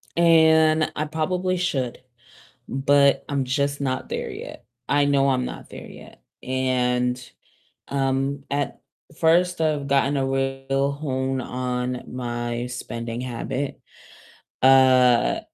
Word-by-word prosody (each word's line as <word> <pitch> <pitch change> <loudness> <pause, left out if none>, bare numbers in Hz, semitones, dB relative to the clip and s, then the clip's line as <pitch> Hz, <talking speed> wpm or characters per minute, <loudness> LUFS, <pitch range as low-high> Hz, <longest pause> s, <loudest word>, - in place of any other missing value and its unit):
And 160 -2 +4
I 155 - -1
probably 180 +4 -1
should, 135 -9 -2 0.7
but 140 0 +3
I'm 140 -2 -1
just 140 +2 -1
not 130 -2 -2
there - - -4
yet. - - -9 0.2
I 145 0 +3
know 140 -1 +3
I'm 125 -1 0
not - - -9
there - - -9
yet, - - -14 0.2
and, 125 -1 0 0.7
um, 135 0 -1
at 140 0 -3 0.4
first 175 +1 +3
I've 150 -3 0
gotten 140 +1 +2
a 135 - 0
real 135 +1 -1
hone 135 -2 -2
on 125 0 -3
my 120 -1 -4
spending 115 -1 -5
habit. 130 +2 -4 0.8
Uh 130 -2 +5
135 Hz, 115 wpm, -23 LUFS, 125-145 Hz, 0.8 s, Uh